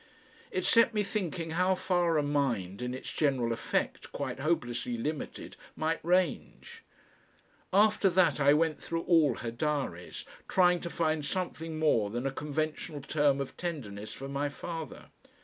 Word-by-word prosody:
It 385 -5 -2
set 230 -1 +5
me 210 - +2
thinking 175 -5 -3
how 180 +3 +2
far 175 -3 +1
a 150 - +2
mind 125 -10 -1
in 125 0 -3
its 130 - -6
general 130 -6 +1
effect 115 - -2
quite - - -4
hopelessly 125 -6 -1
limited, 150 +6 -4 0.2
might 160 +1 -1
range. 185 - 0 0.9
After 210 0 +4
that 175 -5 +3
I 140 0 +5
went 155 +1 +2
through 165 0 -3
all 160 -8 +4
her 115 -2 -4
diaries, 125 - -3 0.2
trying 180 -1 +4
to 170 - -4
find 155 -2 0
something 165 -1 -3
more 130 -10 +2
than 120 +4 -3
a 135 - 0
conventional 150 +1 -3
term 145 0 +2
of 140 - -4
tenderness 110 - -5
for 135 - -7
my 140 +1 -1
father. 160 0 -7
155 Hz, 150 wpm, -30 LUFS, 135-175 Hz, 0.9 s, set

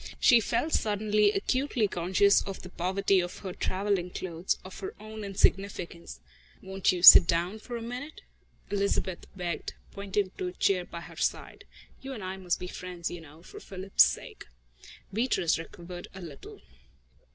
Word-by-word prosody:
She 240 - +6
felt 305 +8 -1
suddenly 210 0 +2
acutely 245 +2 0
conscious 190 +3 +3
of 195 -1 -7
the 180 - -9
poverty 190 +2 +1
of 175 0 -4
her 185 - -4
travelling 190 -1 -1
clothes, 175 -1 -3
of 185 - -10
her 195 - -6
own 215 0 -8
insignificance. 190 - -1 0.4
"Won't 190 0 0
you 180 -1 -4
sit 170 - +12
down 175 +6 0
for 240 +2 -6
a 230 - -7
moment?" 250 +6 -7 0.5
Elizabeth 200 -2 -1
begged, 175 -2 -4 0.2
pointing 200 -1 -2
to 185 - -2
a 180 - -5
chair 185 -1 +1
by 170 - -8
her - - -12
side. - - -3 0.4
"You 270 0 -6
and 220 -6 -7
I 185 +1 -5
must 180 -2 -1
be - - -5
friends, 180 -1 -6
you 175 - -7
know, 160 +1 -15
for 410 - -11
Philip's 195 - +3
sake." - - -3 0.7
Beatrice 205 -8 +1
recovered 175 +2 -9
herself 190 -1 -9
a - - -6
little. 140 -3 -12
190 Hz, 165 wpm, -28 LUFS, 175-205 Hz, 0.7 s, sit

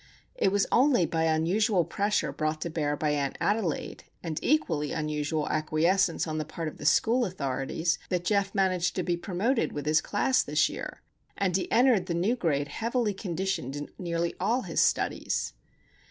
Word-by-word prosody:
It - - +1
was 200 0 +2
only 255 -7 +4
by 165 0 0
unusual 175 +4 +2
pressure 205 +1 0
brought 155 0 -2
to 170 - -3
bear 150 -2 -1
by 150 0 0
Aunt 140 -2 -1
Adelaide, 205 -6 -1 0.2
and 165 -2 -3
equally 165 - +1
unusual 150 0 -2
acquiescence 165 +4 +1
on 155 -1 -3
the - - -1
part 160 +2 -5
of 155 - -7
the - - -1
school 240 +3 +3
authorities, 160 - -1
that 180 -2 -1
Geof 200 0 +1
managed 185 -3 +1
to 185 - -1
be 175 -1 0
promoted 200 +8 -1
with 145 -1 -5
his 155 +1 +3
class 255 +5 +1
this - - +2
year, - - -7 0.3
and 185 -3 0
he 190 - -1
entered 240 -5 +4
the 170 - -1
new 195 +8 +1
grade 145 - -1
heavily 230 - -1
conditioned 185 - -3
in 145 0 -5
nearly 170 -1 -1
all 245 +3 +1
his - - 0
studies. - - 0
175 Hz, 175 wpm, -28 LUFS, 155-205 Hz, 0.3 s, only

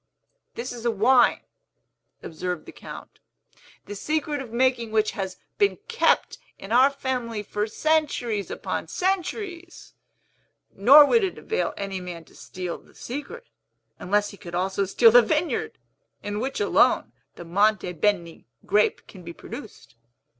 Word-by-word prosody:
"This 245 +2 -5
is 235 -2 -8
a 240 - +1
wine," 235 +3 +4 0.8
observed 180 +1 -5
the - - -10
Count, - - -11 0.7
"the 205 - -7
secret 300 +5 -2
of 245 -4 -9
making 240 -1 +1
which 215 -1 +1
has 190 -4 -5 0.2
been 405 -1 +3
kept 465 0 +1 0.2
in 195 - -10
our 255 +4 +6
family 250 -6 -3
for 210 +1 -2
centuries 245 -6 0
upon - - -4
centuries; 365 -1 -3 0.8
nor 275 +9 +8
would 455 +8 +3
it 380 - -2
avail 445 - -2
any 195 -2 -4
man 175 -2 -8
to - - -22
steal 180 -2 -6
the - - -23
secret, 295 - -7 0.5
unless 205 +2 0
he 200 - -13
could 175 -2 -8
also 190 +2 0
steal 225 +4 +5
the 245 +2 +8
vineyard, 305 +8 -1 0.5
in 205 0 -3
which 265 - -3
alone 420 - +3 0.2
the 175 - -10
Monte 195 +1 +1
Beni 170 - -1 0.2
grape 210 +1 +1
can 190 - -13
be 170 -1 -9
produced. 215 - -11
225 Hz, 145 wpm, -25 LUFS, 195-285 Hz, 0.8 s, nor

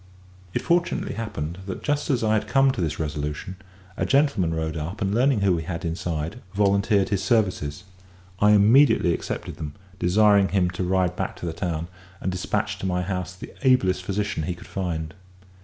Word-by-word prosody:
It - - 0
fortunately 175 0 +1
happened 90 -6 -4
that, 95 - -5
just 145 0 -1
as 125 -5 +1
I 110 0 +2
had 110 - 0
come 135 -1 +4
to 115 - -4
this 80 -3 -2
resolution, 75 +3 -4 0.4
a - - -2
gentleman 140 - +2
rode 80 0 -2
up, 80 +6 -4
and 100 -1 0
learning 125 -1 +3
who 100 -2 +3
we 85 - -1
had 85 +2 -5
inside, 85 +5 -3
volunteered 100 0 +2
his 100 -2 0
services. 95 -8 0 0.6
I 105 0 +5
immediately 105 -3 +5
accepted - - -5
them, 75 -2 -6 0.2
desiring 100 +2 +4
him 90 -1 +1
to 90 +1 -3
ride 90 -1 +1
back - - -3
to - - -7
the 85 - -3
town, 85 -1 -3 0.3
and 95 - -2
despatch 90 0 -2
to 95 - -3
my 90 0 0
house 90 -1 -3
the 90 - -10
ablest 110 -9 +3
physician 100 -2 -2
he 85 +3 -3
could 85 - -13
find. 80 -5 -3
95 Hz, 185 wpm, -24 LUFS, 85-105 Hz, 0.6 s, I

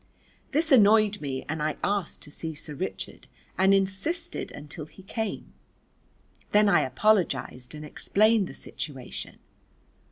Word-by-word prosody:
This 310 +2 +1
annoyed 215 -3 +6
me 135 -3 -4
and 160 +1 -3
I 150 0 -1
asked 200 -3 -1
to 150 - -11
see 160 +1 -5
Sir 150 0 -8
Richard, 180 +6 -6 0.3
and 190 +1 +4
insisted 195 - 0
until 150 +2 -8
he 190 - -16
came. 220 +2 -4 1.0
Then 210 0 +6
I 200 - +5
apologised 155 -4 +1
and 150 0 -7
explained 215 +6 +2
the - - -10
situation. 135 -5 -7
190 Hz, 130 wpm, -27 LUFS, 150-215 Hz, 1.0 s, annoyed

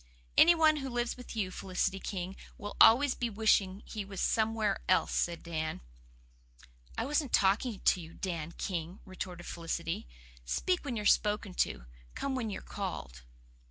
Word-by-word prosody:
"Any 345 +1 +8
one 315 -2 +5
who 270 -2 -4
lives 240 -1 -1
with 250 -1 -10
you, 195 -4 -1
Felicity 190 +1 -1
King, 190 -1 -4 0.2
will 205 +1 -7
always 260 +4 +7
be 240 - -2
wishing 205 -2 +2
he 215 -2 -5
was 195 -1 -8
somewhere 220 -2 +1
else," 185 - +3
said 170 -1 0
Dan. 160 -2 -3 1.2
"I - - 0
wasn't 290 -1 0
talking 200 +3 +2
to 180 - +3
you, 165 0 -11
Dan 170 -3 -4
King," 175 0 -4
retorted 180 -2 -7
Felicity, 165 - -4 0.4
"'Speak 360 - 0
when 265 -5 -3
you're 210 -2 -3
spoken 210 -2 +2
to, 60 - -1 0.3
come 275 - -2
when 245 -4 -2
you're 195 - -5
called. 165 - -5
200 Hz, 160 wpm, -31 LUFS, 175-235 Hz, 1.2 s, Any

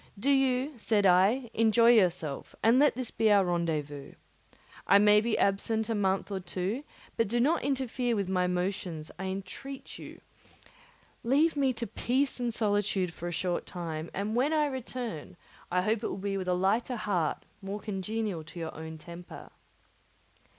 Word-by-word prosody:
"Do 275 +7 +2
you," 270 +1 +2
said 210 -2 +2
I, 200 +7 +4
"enjoy 230 +1 +5
yourself, 175 -10 +1
and 230 +3 +5
let 295 -3 +4
this 255 -2 -4
be 220 -1 +2
our 200 -2 +5
rendezvous. 155 -5 -2 0.7
I 200 - +7
may 210 +1 +6
be 230 0 0
absent 220 +3 +1
a - - +1
month 195 -1 0
or 195 - -2
two; 190 +8 -3 0.3
but 230 - +2
do 240 +4 0
not 290 +8 +2
interfere 255 -3 -1
with 200 -3 -1
my 180 -1 +1
motions, 180 -3 -3
I 190 - -3
entreat 195 +9 -6
you; - - -10 1.0
leave 295 +7 +3
me 275 -2 +2
to 235 0 -4
peace 265 +4 -1
and 240 -1 -1
solitude 205 -5 0
for 175 - -6
a - - -3
short 175 +1 -2
time; 165 -2 -5
and 205 +3 -3
when 270 +6 +2
I 305 -1 +3
return, 245 - -5 0.3
I 180 +1 +2
hope 215 +2 +1
it - - 0
will - - -4
be 200 0 -2
with 185 - -5
a 180 - +2
lighter 210 +7 +1
heart, 180 -8 -1 0.2
more 200 +2 -5
congenial 205 -3 -3
to 170 +2 -10
your 165 -1 -5
own 160 0 -7
temper." 170 +2 -11
205 Hz, 170 wpm, -29 LUFS, 180-240 Hz, 1.0 s, I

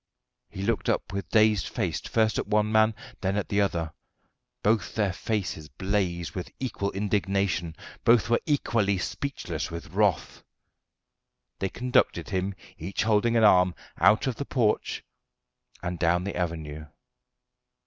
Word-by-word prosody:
He 95 - -6
looked 115 +1 0
up - - -1
with 100 0 -4
dazed 110 -4 +4
face - - -2
first 110 -1 +1
at - - -3
one 105 0 +2
man, 110 0 +4 0.3
then 95 +1 0
at 105 - -2
the 100 0 +2
other: 85 -5 -1 0.7
both 105 -3 +1
their 100 -4 +1
faces 90 -8 -3
blazed 90 +2 -1
with 90 - -5
equal 120 -6 -2
indignation; 95 -4 0 0.3
both 115 -1 +5
were 120 0 +2
equally 115 -9 +1
speechless 90 - -4
with 85 -1 -7
wrath. 100 -6 +1 1.2
They 95 - -1
conducted 125 0 +1
him, 95 0 -1 0.2
each 95 +7 -2
holding 110 +2 +3
an 115 - +4
arm, 90 -4 +5 0.2
out 110 - +5
of 130 -3 -2
the 140 - -3
porch 115 -7 0 0.8
and 85 -1 -3
down 90 +1 +2
the 100 - -4
avenue. 80 -3 -4
100 Hz, 140 wpm, -27 LUFS, 90-110 Hz, 1.2 s, both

